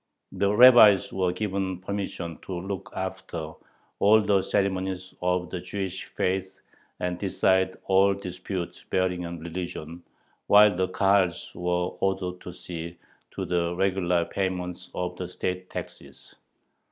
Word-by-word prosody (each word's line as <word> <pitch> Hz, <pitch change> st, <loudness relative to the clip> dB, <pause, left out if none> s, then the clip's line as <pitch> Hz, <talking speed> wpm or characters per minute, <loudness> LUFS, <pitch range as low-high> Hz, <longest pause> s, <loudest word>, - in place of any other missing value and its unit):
The 100 Hz, +1 st, +1 dB
rabbis 110 Hz, -4 st, +7 dB
were 95 Hz, -2 st, +1 dB
given 95 Hz, -1 st, -2 dB
permission 95 Hz, -4 st, -5 dB
"to 90 Hz, -2 st, -3 dB
look 95 Hz, +1 st, -5 dB
after 95 Hz, -4 st, -5 dB, 0.5 s
all 105 Hz, +2 st, +6 dB
the 100 Hz, -2 st, +2 dB
ceremonies 95 Hz, -1 st, -1 dB
of 90 Hz, 0 st, 0 dB
the 90 Hz, -, -3 dB
Jewish 95 Hz, 0 st, -4 dB
faith 95 Hz, 0 st, -2 dB, 0.4 s
and 90 Hz, 0 st, -2 dB
decide 95 Hz, -1 st, +1 dB
all 95 Hz, +1 st, +4 dB
disputes 90 Hz, -1 st, -6 dB
bearing 90 Hz, -1 st, 0 dB
on 85 Hz, 0 st, -6 dB
religion," 85 Hz, -1 st, -6 dB, 0.5 s
while 105 Hz, -1 st, +7 dB
the 95 Hz, +1 st, +1 dB
Kahals 95 Hz, -1 st, +1 dB
were 90 Hz, 0 st, -1 dB
ordered 95 Hz, -2 st, -1 dB
"to 90 Hz, -, -8 dB
see 85 Hz, -1 st, -7 dB, 0.4 s
to -, -, -3 dB
the 85 Hz, -1 st, 0 dB
regular 90 Hz, -2 st, +1 dB
payment 90 Hz, -1 st, -3 dB
of 90 Hz, 0 st, -3 dB
the 90 Hz, -, -4 dB
state 90 Hz, 0 st, -4 dB
taxes." -, -, -9 dB
95 Hz, 130 wpm, -26 LUFS, 90-95 Hz, 0.5 s, rabbis